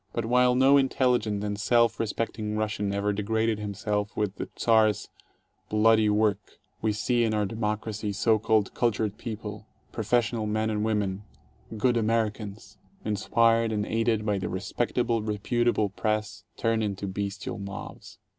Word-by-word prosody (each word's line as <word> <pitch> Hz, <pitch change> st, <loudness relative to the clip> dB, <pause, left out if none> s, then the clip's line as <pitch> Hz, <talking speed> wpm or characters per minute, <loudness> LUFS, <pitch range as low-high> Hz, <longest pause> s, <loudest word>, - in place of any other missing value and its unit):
But 115 Hz, -, -2 dB
while 125 Hz, +1 st, +4 dB
no 135 Hz, +2 st, +6 dB
intelligent 125 Hz, -6 st, +1 dB
and 105 Hz, -1 st, -3 dB
self 115 Hz, +2 st, +3 dB
re 115 Hz, -, 0 dB
specting 105 Hz, 0 st, -3 dB
Russian 105 Hz, -2 st, -1 dB
ever 100 Hz, +1 st, 0 dB
degraded 110 Hz, +2 st, 0 dB
himself 105 Hz, 0 st, -3 dB
with 105 Hz, -2 st, -1 dB
the -, -, -5 dB
Czar's 110 Hz, -3 st, +3 dB, 0.6 s
bloody 110 Hz, 0 st, +4 dB
work, 105 Hz, -1 st, 0 dB, 0.2 s
we 110 Hz, -, +1 dB
see 120 Hz, +3 st, +1 dB
in 110 Hz, -1 st, +1 dB
our 105 Hz, -1 st, +1 dB
democracy 105 Hz, 0 st, -3 dB
so 110 Hz, +2 st, +2 dB
called 110 Hz, -2 st, +1 dB
cultured 110 Hz, -3 st, 0 dB
people, 105 Hz, -2 st, -6 dB, 0.2 s
professional 115 Hz, 0 st, 0 dB
men 110 Hz, +1 st, 0 dB
and 105 Hz, -1 st, -1 dB
women, 105 Hz, -3 st, -1 dB, 0.6 s
"good 120 Hz, +3 st, +2 dB
Americans," 105 Hz, -2 st, -2 dB, 0.3 s
inspired 115 Hz, +2 st, +2 dB
and 105 Hz, -1 st, -1 dB
aided 115 Hz, -1 st, 0 dB
by 105 Hz, -2 st, 0 dB
the 95 Hz, -, -3 dB
"respectable, 115 Hz, +5 st, -1 dB
reputable" 110 Hz, +1 st, 0 dB
press, 105 Hz, +1 st, -2 dB
turn 115 Hz, -1 st, +1 dB
into 100 Hz, -2 st, -2 dB
bestial 100 Hz, +3 st, -4 dB
mobs. 100 Hz, 0 st, -8 dB
110 Hz, 145 wpm, -27 LUFS, 105-115 Hz, 0.6 s, no